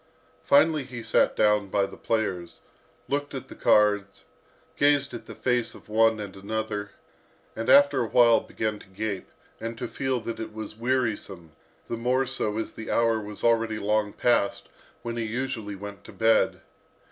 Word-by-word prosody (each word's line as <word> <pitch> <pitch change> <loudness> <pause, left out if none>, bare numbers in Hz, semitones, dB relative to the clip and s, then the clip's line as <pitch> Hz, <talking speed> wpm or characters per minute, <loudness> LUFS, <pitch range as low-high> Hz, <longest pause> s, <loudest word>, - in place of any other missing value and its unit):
Finally 150 0 +4
he 125 -2 -8
sat - - +2
down 105 -1 +3
by 100 +1 +1
the 100 - -10
players, 95 -7 -2 0.5
looked 145 0 -2
at 130 - -7
the - - -10
cards, 105 -2 +2 0.5
gazed 145 -2 +3
at 120 - -8
the 110 - -9
face 120 +1 0
of - - -15
one 110 0 +3
and 100 -2 -7
another, 105 0 -4 0.7
and 115 +1 -3
after 140 -2 +6
a 115 - -1
while 120 0 +5
began 110 -1 -3
to - - -15
gape, 100 0 -4 0.3
and 115 0 -5
to - - -4
feel 130 -2 -2
that 115 0 -6
it 110 - -6
was 110 -1 -7
wearisome, 110 -8 -2 0.4
the 115 - -3
more 125 +3 +1
so, 105 -4 -2
as 110 - -3
the 110 - -8
hour 115 -1 +2
was 105 0 -8
already 115 -2 +2
long 105 0 0
past 120 -4 +1 0.3
when 120 0 -4
he 115 - -1
usually 110 -2 -3
went 100 +1 -9
to - - -12
bed. 110 0 +2
110 Hz, 170 wpm, -26 LUFS, 105-120 Hz, 0.7 s, after